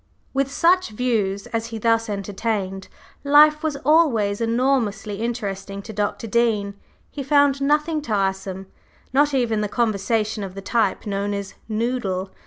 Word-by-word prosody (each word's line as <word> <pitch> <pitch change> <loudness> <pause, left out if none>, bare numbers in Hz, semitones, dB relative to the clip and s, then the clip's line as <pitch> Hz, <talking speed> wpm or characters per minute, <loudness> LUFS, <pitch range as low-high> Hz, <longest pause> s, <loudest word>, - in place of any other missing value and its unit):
With 270 0 0
such 355 +3 +3
views 210 -4 -1
as 230 0 -1
he 230 -1 -6
thus 225 0 +1
entertained, 195 -1 -3 0.4
life 300 +1 +6
was 310 -3 -2
always 235 -10 +3
enormously 230 -4 0
interesting 200 -4 -4
to 220 - -8
Dr. 205 +1 -2
Dean 215 -3 +1 0.4
he 290 - -5
found 280 0 +3
nothing 300 +2 +1
tiresome, 195 -5 -2 0.5
not 290 +1 +3
even 230 -4 +1
the 210 - -2
conversation 215 -1 0
of 190 -1 -7
the 195 - -6
type 230 +2 0
known 200 0 -2
as 200 -1 -5 0.2
Noodle. 215 -5 -2
225 Hz, 140 wpm, -22 LUFS, 200-265 Hz, 0.5 s, life